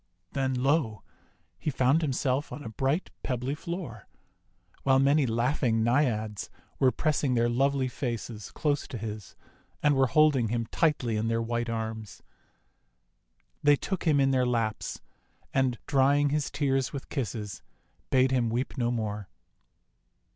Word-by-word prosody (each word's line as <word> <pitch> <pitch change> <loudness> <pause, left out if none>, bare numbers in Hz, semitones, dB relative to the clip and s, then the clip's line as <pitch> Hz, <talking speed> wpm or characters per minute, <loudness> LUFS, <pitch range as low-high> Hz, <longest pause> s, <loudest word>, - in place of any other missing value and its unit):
Then, 135 -1 0
lo! 125 -5 +1 0.6
he - - -1
found 130 +3 +3
himself 135 -1 0
on 145 - -7
a 115 - -6
bright 135 - -1
pebbly 125 +1 -2
floor, 150 - -6 0.7
while 135 -1 +4
many 140 +1 +4
laughing 115 0 +1
Naiads 110 -5 0 0.3
were 130 -1 +5
press 155 +2 0
ing 130 -3 +2
their 120 0 +3
lovely 135 +2 +1
faces 115 -4 -4
close 145 -2 -1
to 125 - -6
his, 105 -2 -7 0.5
and 150 -1 +4
were 135 -1 +4
holding 140 -2 +4
him 115 +1 -1
tightly 145 -9 +1
in 110 +1 -1
their 115 0 +1
white 120 +1 -2
arms. 110 -1 -5 1.4
They 145 0 +6
took 190 +6 -4
him 150 -3 +4
in 135 0 +3
their 130 -1 +3
laps, 115 -3 -1 0.5
and, 130 -3 +2
drying 140 +1 +3
his 150 0 0
tears 135 -3 0
with 140 - -7
kisses, 110 -6 -4 0.5
bade 130 0 +4
him 125 -3 +2
weep 125 +4 -2
no 120 -1 +1
more. 105 -4 -3
130 Hz, 145 wpm, -28 LUFS, 115-140 Hz, 1.4 s, They